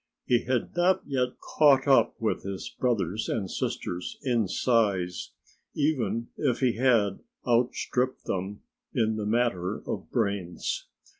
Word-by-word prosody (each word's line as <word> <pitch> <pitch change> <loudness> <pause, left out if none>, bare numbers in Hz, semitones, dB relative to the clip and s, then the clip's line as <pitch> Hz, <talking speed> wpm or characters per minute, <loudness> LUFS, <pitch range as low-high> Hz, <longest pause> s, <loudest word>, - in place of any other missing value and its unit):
He 120 -1 +2
had 125 +2 -1
not 180 +2 +3
yet 125 -3 -1
caught 140 -3 +4
up 135 - +5
with 110 - 0
his 95 -1 -5
brothers 110 -5 -1
and 100 -5 -2
sisters 90 +1 -3
in 120 -6 +1
size, 95 -4 +1 0.5
even 135 -6 0
if 130 -5 +1
he 125 -3 +2
had 115 -6 +3 0.3
outstripped 125 +1 +1
them 95 +2 -3 0.3
in 110 -1 +2
the 105 -1 -3
matter 105 -4 0
of - - -4
brains. 100 -4 -2
115 Hz, 130 wpm, -27 LUFS, 100-130 Hz, 0.5 s, up